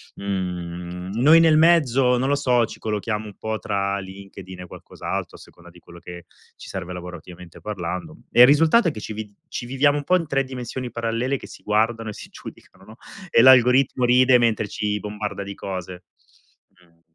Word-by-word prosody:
Mhmm, 90 -2 -5
noi 155 +4 +7
nel 160 -2 +5
mezzo 135 -7 +4
non 130 +2 0
lo 145 - +3
so, 125 -4 +2
ci - - -11
collochiamo 105 0 -3
un 105 -2 -11
po' 110 0 -3
tra 100 -1 -2
LinkedIn 95 -1 -10
e - - -8
qualcos'altro - - -7
a - - -18
seconda 85 0 -16
di 90 +1 -17
quello 85 0 -15
che 85 -1 -11 0.3
ci - - -12
serve 90 - -6
lavorativamente 90 0 -10
parlando. 90 -4 -5
E 120 - +5
il 125 - +10
risultato 165 +9 +4
è - - -4
che 110 - -8
ci 110 - -7
vi 105 -1 -7 0.2
ci 120 - -6
viviamo 145 +3 +2
un 145 - -4
po' 185 - +2
in 165 -3 -4
3 135 -1 0
dimensioni 125 -1 -6
parallele 115 +4 -2
che - - -11
si - - -13
guardano 110 +1 0
e - - -6
si - - -11
giudicano, - - -13
no, 110 - -14 0.3
e 115 - +5
l'algoritmo 130 0 +5
ride 125 +1 +5
mentre 110 -3 +1
ci 105 +1 -3
bombarda 105 -1 -5
di 100 - -7
cose. 90 -2 -7 0.7
Mh. 90 -3 -28
110 Hz, 195 wpm, -22 LUFS, 95-125 Hz, 0.7 s, il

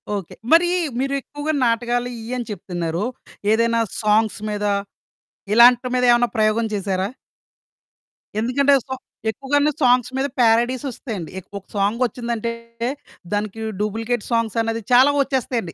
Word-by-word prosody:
Okay. 195 -5 -6 0.2
మరీ 340 +2 +6 0.3
మీరు 275 +1 -1
ఎక్కువగా 290 +3 -4
నాటకాలు 240 +1 0
ఇయ్యని 240 +2 -4
చెప్తున్నారు. 175 -2 -3 0.5
ఏదైనా 230 +1 +2 0.2
సాంగ్స్ 215 0 +2
మీద, 210 0 -2 0.9
ఇలాంటి 245 +2 +7
మీద 250 - +2
ఏమైనా 240 0 +3
ప్రయోగం 215 +1 +2
చేసారా? 195 -1 -1 1.3
ఎందుకంటే 265 +5 +3
స - - -39 0.4
ఎక్కువగాను 285 +5 +1
సాంగ్స్ 250 -1 +4
మీద 270 +1 +1
పారడీస్ 240 +2 +3
ఒస్తాయండి. 210 - -6
ఎక్ 185 - -17
ఒక 195 - -10
సాంగ్ 205 +3 +1
వొచ్చిందంటే 235 -1 -3 0.8
దానికి 210 +1 -2 0.2
డూప్లికేట్ 225 +2 -2
సాంగ్స్ 230 -2 0
అన్నది 225 0 -2
చాలా 260 +4 +7
వొచ్చేస్తాయండి. 255 -8 -1
230 Hz, 120 wpm, -21 LUFS, 210-250 Hz, 1.3 s, ఇలాంటి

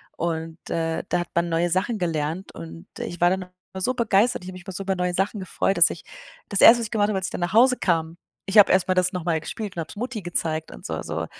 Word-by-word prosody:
Und, 165 -1 -3
äh, 165 -1 -1
da - - +1
hat 175 - -7
man 170 0 0
neue 170 +1 0
Sachen 200 +6 0
gelernt, 165 0 -2
und 85 0 -10
ich 175 - -5
war 175 +1 +4
dann 190 - -1
immer 185 +1 -11
so 255 +6 0
begeistert, 225 -3 +2
ich 185 - -7
habe - - -8
mich 180 -1 -11
immer 190 - -6
so 195 - -5
über 195 0 -1
neue 180 -1 -1
Sachen 195 +3 -1
gefreut, 190 +1 -1
dass 170 - +8
ich - - -8 0.5
das 200 - 0
1., 235 - +9
was - - -2
ich 220 - -8
gemacht 210 -3 +2
habe, 205 - 0
als 190 - -2
ich - - -7
dann - - -5
nach 175 +2 -2
Hause 250 +3 +5
kam 165 -2 0 0.3
ich 200 +2 +5
habe 205 - +7
erstmal 185 0 +3
das 185 0 +2
nochmal 170 -3 -1
gespielt 205 +5 -6
und - - -4
hab 160 - -4
es - - -11
Mutti 235 0 -4
gezeigt 160 -3 -2
und - - -12
so, - - -3
so. - - -4
180 Hz, 275 wpm, -24 LUFS, 165-195 Hz, 0.5 s, 1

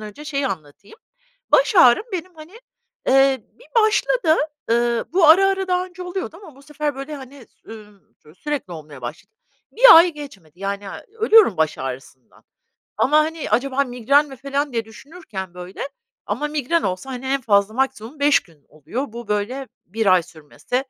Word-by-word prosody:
önce 215 +7 -10
şeyi 280 -2 -2
anlatayım. 160 - -8 0.6
Baş - - +4
ağrım 250 - +6
benim, 365 0 -5
hani, 325 +8 -14 0.5
eee, 270 -2 +3
bir - - -21 0.2
başladı, 430 -5 +2 0.3
ııı, 235 0 +1
bu 355 -3 +4
ara, 375 +5 +7
ara 385 -1 -1
daha 360 0 +1
önce 365 0 -11
oluyordu 360 -2 -5
ama 310 -8 -14
bu 275 - -17
sefer, 300 0 -4
böyle, 275 +3 -7
hani, 265 -2 -13
s - - -20
ümm, 210 -3 -15
ço 150 +1 -19
sürekli 290 -5 -5
olmaya 150 -4 -10
başladı. 120 +7 -8 0.4
1 - - +8
Ay 335 +2 +7
geçmedi, 195 - -12
yani, 200 +1 -4
eee, 195 - -9
ölüyorum 435 - +5
baş 155 -1 0
ağrısından 130 -1 -9 0.5
ama, 300 +3 +3
hani, 315 +1 -1
"Acaba 275 +2 +1
migren 275 +3 +2
mi?" 270 - -10
falan 275 +1 -3
diye 230 -1 -2
düşünürken 220 - -9
böyle 180 +1 -9 0.4
ama 300 - -2
migren 300 +2 -1
olsa, 185 +7 -3
hani, 260 0 -6
en 270 +1 0
fazla 205 -2 +2
maksimum 265 +1 -3
5 285 0 +4
gün 160 -6 -25
oluyor, 155 - -5
bu 235 -1 -8
böyle 220 +6 -3 0.2
1 220 +4 -3
ay 185 -3 +4
sürmesi. 155 +8 -9
265 Hz, 170 wpm, -21 LUFS, 200-305 Hz, 0.6 s, 1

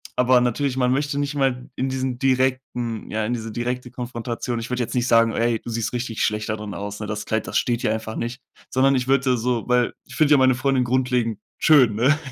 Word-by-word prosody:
aber 125 0 +4
natürlich, 130 +2 0
man 125 -1 +2
möchte 145 +1 0
nicht 145 0 -2
mal 130 -3 0
in 130 +1 -1
diesen 130 -1 -2
direkten 130 -3 -1
ja, 110 0 -1
in 120 - -1
diese 115 -2 -4
direkte 125 +2 -3
Konfrontation. 120 -1 -4
Ich 115 - -6
würde 125 0 -1
jetzt 115 - -5
nicht 125 0 +1
sagen: 115 -1 +4
„Ey, 115 -1 +1
du - - -8
siehst 115 -1 -2
richtig 120 -2 -2
schlecht 105 0 -2
da 110 - 0
drin 105 -2 -6
aus, 105 +1 -6
ne? 105 - -5
Das 105 0 -4
Kleid, 110 0 -1
das - - 0
steht 120 -1 0
hier 110 - +1
einfach 110 0 -5
nicht.“ 120 +2 -4 0.3
Sondern 135 +1 +3
ich 125 -1 -1
würde 130 -2 +2
so 120 0 -1
weil 125 -1 +2
ich - - -12
finde 150 -1 +3
ja 145 - +6
meine 130 -1 +4
Freundin 135 -1 +1
grundlegend 125 -3 0 0.2
schön, 130 -9 +5
ne, 135 +7 +3
125 Hz, 235 wpm, -23 LUFS, 115-130 Hz, 0.3 s, ja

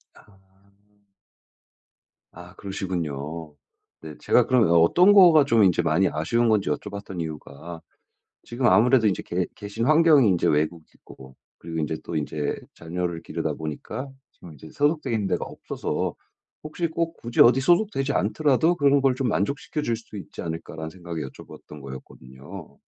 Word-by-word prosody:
아. 100 -2 -21 2.0
아 90 +2 -12
그러시군요. 80 -5 -5 0.5
네. 80 -1 -9
제가 - - +2
그럼 125 -6 +3
어 - - 0
어떤 180 - +5
거가 170 -7 +7
좀 115 -6 +3
인제 90 -3 +3
많이 90 +5 +2
아쉬운 115 +10 0
건지 105 -7 +1
여쭤봤던 100 +2 -5
이유가 80 +1 -8 0.6
지금 120 +2 -6
아무래도 115 +4 +4
인제 95 - 0
계 90 0 -2
계신 105 +2 -5
환경이 155 -4 +5
인제 90 - +1
외국이고 75 -4 -4 0.2
그리고 80 0 -6
인제 80 +1 -2
또 85 - -5
인제 75 0 -2 0.2
자녀를 85 0 -4
기르다 - - -3
보니까 80 - -6 0.2
지금 85 - -14
인제 75 +2 -13
소속되어 150 -2 0
있는 105 -3 0
데가 90 - -1
없어서 - - -4 0.5
'혹시 165 +2 -3
꼭 165 +1 -3
굳이 120 0 -2
어디 125 +3 +5
소속되지 170 -3 +1
않더라도 140 - +2
그런 140 -2 +3
걸 135 -2 +3
좀 130 -1 -1
만족시켜줄 120 +5 -2
수 110 -2 -12
있지 95 - -9
않을까?'라는 80 -1 -6
생각에 85 -2 -7
여쭤봤던 75 +2 -13
거였거든요. 70 +5 -11
95 Hz, 340 characters per minute, -24 LUFS, 80-130 Hz, 2.0 s, 거가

